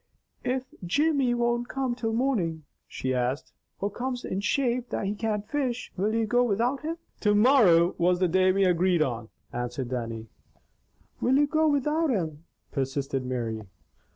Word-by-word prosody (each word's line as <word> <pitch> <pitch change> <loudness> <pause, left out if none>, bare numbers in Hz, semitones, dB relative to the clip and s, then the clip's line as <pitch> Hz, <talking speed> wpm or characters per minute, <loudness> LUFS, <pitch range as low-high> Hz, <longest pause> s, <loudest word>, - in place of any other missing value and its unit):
"If 255 0 0 0.2
Jimmy 280 - +2
don't 240 0 0
come 265 -2 -1
till 235 -2 -2
morning," 205 - 0 0.2
she 130 0 -3
asked, 125 +2 -2 0.3
"or 200 +1 -1
comes 250 +2 -4
in 185 - -2
shape 245 +3 0
that - - -2
he 200 - 0
can't 210 -1 -2
fish, 260 -5 -2
will 210 +4 0
you 225 -1 +2
go 245 +3 +3
without 240 +4 0
him?" 325 +2 -3 0.2
"To 210 -1 +3
morrow 205 -8 +5
was 180 +1 +3
the 185 0 +2
day 185 +2 +4
we 195 +1 +2
agreed 180 -2 +3
on," 120 -5 -4 0.2
answered 120 +1 -3
Dannie. 115 -3 -4 1.0
"Will 260 +2 +3
you 290 - +5
go 315 +2 +2
without 300 +2 +1
him?" 165 - -2 0.3
persisted 135 -1 -2
Mary. 120 -3 -3
205 Hz, 160 wpm, -27 LUFS, 155-250 Hz, 1.0 s, morrow